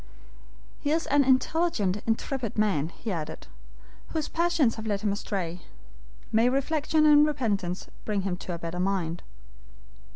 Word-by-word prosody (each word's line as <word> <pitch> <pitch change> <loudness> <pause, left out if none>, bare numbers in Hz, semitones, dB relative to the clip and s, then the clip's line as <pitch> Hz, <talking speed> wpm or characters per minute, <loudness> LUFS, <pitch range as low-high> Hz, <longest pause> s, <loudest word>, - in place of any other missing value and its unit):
"He 285 - -2
is 320 +2 +1
an 285 0 +4
intelligent, 260 - +2
intrepid 230 0 -1
man," 190 -8 +1
he 220 +5 -6
added, 160 -3 -5 0.6
"whose 315 -2 -2
passions 335 -8 +2
have 220 0 -6
led 200 -2 -1
him 210 -2 +1
astray. 185 -4 -3 0.7
May 225 +3 +4
reflection 305 +3 +1
and 295 -1 +7
repentance 205 -11 -1 0.2
bring 205 -3 -1
him 190 -2 -1
to 180 - -6
a - - -3
better 170 +1 -5
mind!" 180 -3 -1
215 Hz, 140 wpm, -27 LUFS, 185-290 Hz, 0.7 s, and